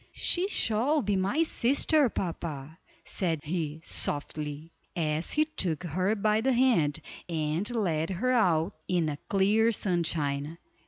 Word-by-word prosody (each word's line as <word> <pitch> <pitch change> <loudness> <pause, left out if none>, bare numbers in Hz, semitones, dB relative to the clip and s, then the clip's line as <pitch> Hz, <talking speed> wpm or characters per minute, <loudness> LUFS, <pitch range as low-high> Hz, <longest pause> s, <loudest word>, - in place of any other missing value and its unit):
"She 360 +2 +2
shall 260 - +1
be 205 0 0
my 200 +12 +1
sister, 285 0 +2
papa," 160 -5 -5 0.3
said 165 -5 -1
he, 155 -1 -3
softly, 150 +2 -2 0.2
as 155 -1 -1
he 305 0 +3
took 180 - -2
her 185 +5 0
by 215 +1 +1
the 265 +2 +2
hand, 210 - +2 0.3
and 160 +5 -1
led 170 -9 -1
her 220 +8 0
out 185 -6 +2
in 175 -3 +1
the 145 -2 -3
clear 210 +4 +3
sunshine. 160 -6 -1
180 Hz, 130 wpm, -28 LUFS, 155-225 Hz, 0.3 s, he